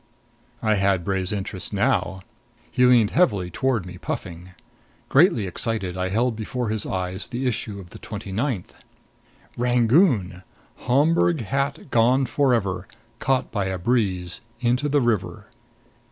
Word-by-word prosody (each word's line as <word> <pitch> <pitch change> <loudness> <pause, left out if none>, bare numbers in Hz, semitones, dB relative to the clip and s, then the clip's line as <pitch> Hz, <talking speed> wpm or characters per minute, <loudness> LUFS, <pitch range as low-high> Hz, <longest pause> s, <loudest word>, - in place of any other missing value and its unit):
I 110 -1 +3
had 95 -3 +1
Bray's 95 -1 -1
interest 95 -2 -4
now. 100 -4 0 0.5
He 125 0 +4
leaned 120 -4 +5
heavily 100 - +2
toward 125 -1 0
me, 90 0 -9
puffing. 85 +1 -6 0.6
Greatly 135 - +4
excited, 95 -1 -2
I 95 0 -1
held 115 +4 +1
before 115 +2 -3
his 110 -1 -2
eyes 95 +1 -3
the 125 +2 -4
issue 110 -4 -2
of 90 -3 -12
the - - -11
twenty 105 -2 -7
ninth: 110 -2 -2 0.9
"RANGOON: 120 - +3 0.5
Homburg 155 +4 +3
hat 140 +5 -2
gone 125 +4 +4
forever 115 -8 0 0.3
caught 135 -1 0
by 100 -3 -1
a 95 0 -2
breeze 90 -4 -1 0.2
into 125 +4 +1
the 145 0 +3
river." 120 -5 -1
110 Hz, 135 wpm, -23 LUFS, 95-125 Hz, 0.9 s, leaned